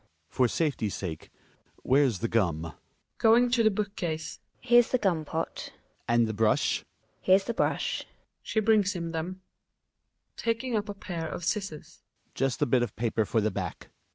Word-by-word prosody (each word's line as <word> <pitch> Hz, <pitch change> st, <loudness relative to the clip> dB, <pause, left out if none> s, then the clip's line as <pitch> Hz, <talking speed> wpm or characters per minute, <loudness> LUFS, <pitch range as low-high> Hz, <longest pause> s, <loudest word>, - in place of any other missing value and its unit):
For 125 Hz, -, +2 dB
safety's 125 Hz, -, -1 dB
sake 80 Hz, -5 st, -6 dB, 0.5 s
Where's 130 Hz, -8 st, +3 dB
the -, -, +1 dB
gum? 90 Hz, -9 st, +1 dB
Gin 85 Hz, -, -6 dB
A -, -, -21 dB, 0.5 s
{going 235 Hz, +2 st, +5 dB
to 245 Hz, -1 st, +3 dB
the 220 Hz, -, +5 dB
book 205 Hz, 0 st, -3 dB
case). 160 Hz, -3 st, -4 dB, 0.2 s
Here's 240 Hz, -1 st, +5 dB
the 255 Hz, -, +2 dB
gum 175 Hz, -9 st, 0 dB
pot 160 Hz, +2 st, -4 dB
Hjalmar. -, -, -37 dB
And 120 Hz, 0 st, +4 dB
the 110 Hz, -, -3 dB
brush? 110 Hz, 0 st, +2 dB
GiNA. -, -, -21 dB, 0.4 s
Here's 190 Hz, +1 st, +4 dB
the 235 Hz, -, -3 dB
brush. -, -, -1 dB, 0.3 s
{She 220 Hz, -, -1 dB
brings 210 Hz, -2 st, +3 dB
him 170 Hz, -2 st, -4 dB
them.) 165 Hz, 0 st, -2 dB
Hjalmar 185 Hz, 0 st, -17 dB
{taking 230 Hz, +1 st, -1 dB
up 210 Hz, 0 st, -1 dB
a 205 Hz, -, -4 dB
pair 170 Hz, -4 st, -5 dB
of 175 Hz, -, -5 dB
scissors). 190 Hz, -5 st, -4 dB, 0.3 s
Just 135 Hz, +2 st, 0 dB
a -, -, +4 dB
bit 125 Hz, -1 st, +3 dB
of 120 Hz, -5 st, -2 dB
paper 110 Hz, -1 st, 0 dB
for 110 Hz, +2 st, +1 dB
the 110 Hz, +1 st, +1 dB
back. -, -, -5 dB
165 Hz, 185 wpm, -28 LUFS, -, 0.5 s, going